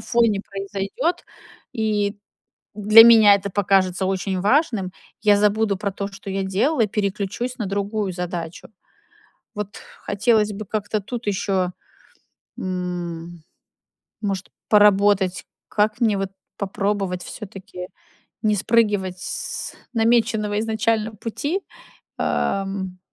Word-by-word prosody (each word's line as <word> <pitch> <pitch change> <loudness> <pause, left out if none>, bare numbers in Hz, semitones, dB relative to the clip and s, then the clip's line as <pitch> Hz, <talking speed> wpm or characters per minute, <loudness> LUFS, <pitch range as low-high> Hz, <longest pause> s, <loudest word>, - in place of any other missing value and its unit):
фоне 230 -5 +2
произойдёт, 195 - -3 0.5
и 210 -2 0 0.6
для 215 +2 +8
меня 220 -3 +8
это 200 0 -3
покажется 190 -1 +2
очень 190 0 -1
важным. 210 - +2 0.3
Я 210 -1 +5
забуду 210 0 +2
про 200 0 -2
то, 200 +1 -4
что 195 0 -10
я 195 0 -1
делала, 220 +6 +1
переключусь 210 +5 -2
на 215 - -3
другую 200 0 -2
задачу. 175 -2 -5 0.9
Вот 205 -1 -5 0.3
хотелось 210 +1 +2
бы 210 +2 -6
как-то 215 +1 -2
тут 240 +4 -6
ещё, 190 -2 0 0.9
м, 175 -2 -4 0.8
может, 195 -3 -2 0.2
поработать, 205 -2 +4 0.2
как 215 +2 +1
мне 215 -4 +3
вот 195 -1 -2 0.3
попробовать 195 -2 -2
всё-таки 195 -3 -8 0.6
не 210 -1 +3
спрыгивать 205 -3 +1
с - - -5 0.2
намеченного 225 -2 +2
изначально 220 0 0
пути, 290 - -3 0.6
эм, 195 -2 -1
205 Hz, 105 wpm, -22 LUFS, 190-215 Hz, 0.9 s, для